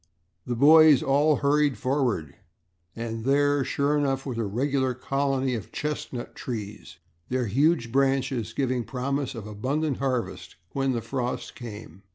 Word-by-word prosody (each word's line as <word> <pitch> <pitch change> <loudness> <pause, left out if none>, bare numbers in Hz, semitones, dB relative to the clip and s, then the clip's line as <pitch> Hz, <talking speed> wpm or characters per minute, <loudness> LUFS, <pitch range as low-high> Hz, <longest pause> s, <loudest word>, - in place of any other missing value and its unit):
The 120 - -1
boys 155 +2 +7
all 145 +3 +3
hurried 145 0 +2
forward 130 - -1 0.6
and 115 -1 -4
there, 145 +1 +3
sure 140 +3 0
enough, 135 -2 0
was 125 -4 -4
a - - 0
regular 130 +4 0
colony 135 0 0
of 110 -5 -5
chestnut 150 -4 -4
trees, 105 -8 -6 0.3
their 125 -1 0
huge 130 - +2
branches 135 -3 +1
giving 130 -3 0
promise 135 +2 -3
of 110 -3 -7
abundant 135 +8 -2
harvest, 130 -3 -3 0.2
when 135 -1 0
the 120 - -2
frost 125 +1 -3
came. 105 -6 -10
130 Hz, 140 wpm, -26 LUFS, 120-140 Hz, 0.6 s, boys